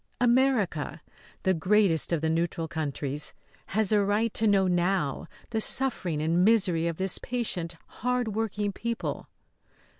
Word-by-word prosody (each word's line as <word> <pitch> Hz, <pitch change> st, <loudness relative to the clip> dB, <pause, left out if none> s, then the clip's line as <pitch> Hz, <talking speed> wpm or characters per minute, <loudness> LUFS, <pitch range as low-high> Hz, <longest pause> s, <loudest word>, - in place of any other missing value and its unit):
America, 240 Hz, -, +1 dB, 0.4 s
the 190 Hz, -, +3 dB
greatest 185 Hz, -2 st, +2 dB
of 165 Hz, -3 st, 0 dB
the 160 Hz, -, 0 dB
neutral 165 Hz, 0 st, -1 dB
countries, 150 Hz, -2 st, -3 dB, 0.3 s
has 215 Hz, 0 st, +1 dB
a 210 Hz, -1 st, +4 dB
right 205 Hz, +3 st, 0 dB
to 220 Hz, -, +1 dB
know 195 Hz, -2 st, +4 dB
now 175 Hz, -5 st, 0 dB, 0.2 s
the 220 Hz, -1 st, 0 dB
suffering 210 Hz, -, +2 dB
and 170 Hz, +3 st, +2 dB
misery 190 Hz, -6 st, +3 dB
of 165 Hz, -1 st, -3 dB
this 190 Hz, 0 st, +1 dB
patient, 185 Hz, -9 st, -2 dB
hard 250 Hz, -1 st, -2 dB
working 210 Hz, -1 st, -2 dB
people. 235 Hz, +4 st, -4 dB
190 Hz, 140 wpm, -27 LUFS, 165-220 Hz, 0.4 s, a